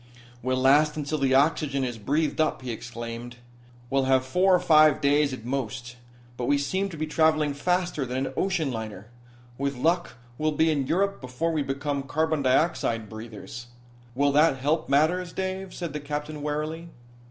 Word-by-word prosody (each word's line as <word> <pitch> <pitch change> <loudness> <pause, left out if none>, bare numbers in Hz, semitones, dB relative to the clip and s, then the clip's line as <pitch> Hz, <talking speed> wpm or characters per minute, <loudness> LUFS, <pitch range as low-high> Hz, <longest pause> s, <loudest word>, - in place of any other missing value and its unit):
"We'll 130 +1 0
last 145 +4 +4
until 150 +1 -2
the 135 -1 +2
oxygen 140 -1 +2
is 120 -3 -3
breathed 150 +9 0
up," 155 -4 0
he 125 - -3
exclaimed. 115 +1 -7 0.6
"We'll 135 -1 +2
have 130 -1 +3
four 180 +7 +4
or - - +3
five 155 -4 +5
days, 145 0 +3
at 125 -3 -7
most. 120 -2 -4 0.4
But 125 - -2
we 145 +3 +3
seem 190 +8 -1
to 165 - -8
be 155 - -1
traveling 155 -1 +2
faster 180 +1 0
than 130 +1 -2
an - - -5
ocean 170 -6 0
liner. 110 -3 -6 0.5
With 140 0 -1
luck, 170 +7 0 0.3
we'll 155 0 +1
be 160 +2 +3
in 140 -4 -1
Europe 195 +6 0
before 130 +6 -2
we 155 -2 0
become 140 +1 -2
carbon 155 +3 0
dioxide 130 -5 +1
breathers." 115 +2 -9 0.5
"Will 140 +2 +3
that 150 0 +4
help 145 +4 0
matters, 165 +5 +2
Dave?" 190 0 -3
said 170 -5 -5
the 150 - -3
captain 150 +1 -5
wearily. 155 +3 -3
145 Hz, 175 wpm, -26 LUFS, 130-160 Hz, 0.6 s, five